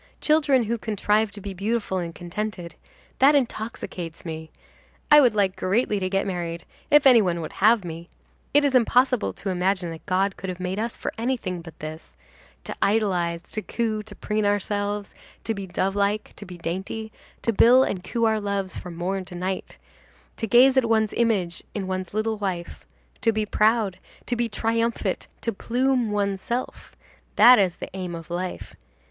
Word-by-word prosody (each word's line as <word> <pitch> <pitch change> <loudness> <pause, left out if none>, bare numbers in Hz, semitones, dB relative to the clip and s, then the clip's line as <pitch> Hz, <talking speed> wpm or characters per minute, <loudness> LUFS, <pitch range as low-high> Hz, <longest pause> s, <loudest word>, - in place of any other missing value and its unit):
Children 290 -5 +3
who 230 +1 -2
contrive 215 0 +1
to 205 0 -8
be 195 0 -6
beautiful 200 0 -1
and 170 -2 -5
contented,—that 205 - -1
intoxicates 220 - -3
me. 160 -1 -6 0.6
I 295 0 +10
would 245 -6 +4
like 195 -2 +2
greatly 210 +2 0
to 185 -1 -1
get 195 +1 0
married, 170 -3 -4 0.2
if 295 -1 +6
any 250 -4 +8
one 175 -4 0
would 155 - -6
have 220 -3 +5
me. 170 +1 -7 0.4
It 290 0 +4
is 280 - +1
impossible 250 0 +3
to 195 - -5
imagine 180 -1 0
that 165 - -9
God 195 +1 +1
could 190 - -5
have 180 0 -5
made 185 +2 -3
us 230 +1 -3
for - - -4
anything 230 -8 -2
but 165 -1 -12
this: 155 +1 -9 0.5
to - - -6
idolize, 180 -5 +1
to 215 - -3
coo, 220 -1 -2
to 210 -1 -12
preen 210 0 -2
ourselves, 205 0 -1 0.3
to 225 - -1
be 200 -2 -6
dove 190 +2 -1
like, 205 +1 0
to 205 - -10
be 180 -1 -9
dainty, 190 +6 -4 0.3
to 230 - +1
bill 250 +5 +6
and 185 -8 -3
coo 230 +6 -2
our 220 -1 +2
loves 200 -2 -2
from 175 -2 -7
morn 185 +3 -2
to 180 - -10
night, 185 +2 -4 0.6
to 225 - -3
gaze 255 +5 +6
at 260 - +4
one's 220 -2 +2
image 200 -8 0
in 200 -2 -2
one's 185 -1 -4
little 215 +1 -1
wife, 185 -4 -4 0.3
to 230 - +3
be 215 -1 -1
proud, 215 -2 +2 0.3
to 245 - -1
be 235 0 -1
triumphant, 230 +2 -1
to 230 - -1
plume 250 +2 0
oneself; 205 +4 -3 0.4
that 240 +2 +8
is 185 -4 +2
the - - -7
aim 180 -2 -4
of 165 0 -9
life. 180 +1 -4
205 Hz, 175 wpm, -24 LUFS, 185-230 Hz, 0.6 s, I